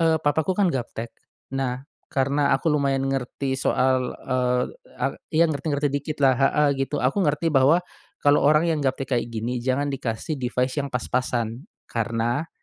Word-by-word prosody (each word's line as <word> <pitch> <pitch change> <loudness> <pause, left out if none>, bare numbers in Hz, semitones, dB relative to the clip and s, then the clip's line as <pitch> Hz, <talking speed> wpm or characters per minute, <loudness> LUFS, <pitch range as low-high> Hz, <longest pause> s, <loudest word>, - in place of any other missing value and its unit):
eee, 165 -1 +4
papaku 160 +4 0
kan 195 -4 +3
gaptek. 120 -2 -4 0.4
Nah, 130 -1 -2 0.2
karena 140 0 +2
aku 160 +3 0
lumayan 140 -2 +1
ngerti 135 0 -2
soal, 130 -1 +1
eee, 125 -1 0 0.3
a - - 0 0.2
iya 165 +1 +4
ngerti-ngerti 145 -2 -1
dikitlah 145 -1 +2
heeh, 145 +2 +4
gitu. 135 0 -1
Aku 135 +10 +2
ngerti 160 -1 +1
bahwa, 145 +6 +4 0.4
kalau 145 0 +5
orang 150 +2 +4
yang 155 - -1
gaptek 135 -1 -2
kayak 120 -1 +1
gini 120 +2 -3
jangan 135 +3 0
dikasih 130 +3 -3
device 125 +2 0
yang 140 - -3
pas-pasan 125 - -2 0.2
karena 115 +6 -1
135 Hz, 150 wpm, -24 LUFS, 125-150 Hz, 0.4 s, kalau